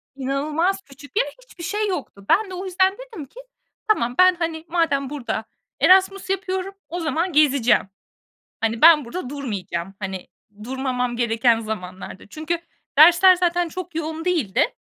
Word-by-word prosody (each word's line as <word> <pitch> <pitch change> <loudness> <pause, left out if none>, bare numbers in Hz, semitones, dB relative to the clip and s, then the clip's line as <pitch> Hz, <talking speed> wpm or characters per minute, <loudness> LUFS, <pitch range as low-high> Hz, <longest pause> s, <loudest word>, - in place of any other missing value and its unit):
İnanılmaz 295 +8 -1
küçük 285 +6 -12
yer. - - +3 0.2
Hiçbir 370 -8 -13
şey 420 +5 -1
yoktu. 255 - -6
Ben 420 -1 +3
de 370 - -8
o 370 +2 -5
yüzden 375 +1 +1
dedim 480 - -9
ki: 460 - -15 0.5
"Tamam, 245 - +1
ben, 370 0 +6
hani, 330 -2 -4
madem 320 -6 0
burada 245 -6 -4 0.3
Erasmus 375 +6 +4
yapıyorum, 385 0 -2 0.2
o 350 - -4
zaman 330 +3 -1
gezeceğim. 275 -8 +3 0.7
Hani, 225 0 -1
ben 315 -3 +8
burada 250 +2 -6
durmayacağım, 195 -10 -5
hani, 190 -2 -5 0.4
durmamam 250 -1 -2
gereken 235 0 +2
zamanlarda." 185 -4 -7
Çünkü 315 +8 -3 0.4
dersler 345 +4 +8
zaten 350 -1 0
çok 355 +1 -7
yoğun 320 0 -4
değildi. 300 - 0
315 Hz, 145 wpm, -22 LUFS, 250-365 Hz, 0.7 s, ben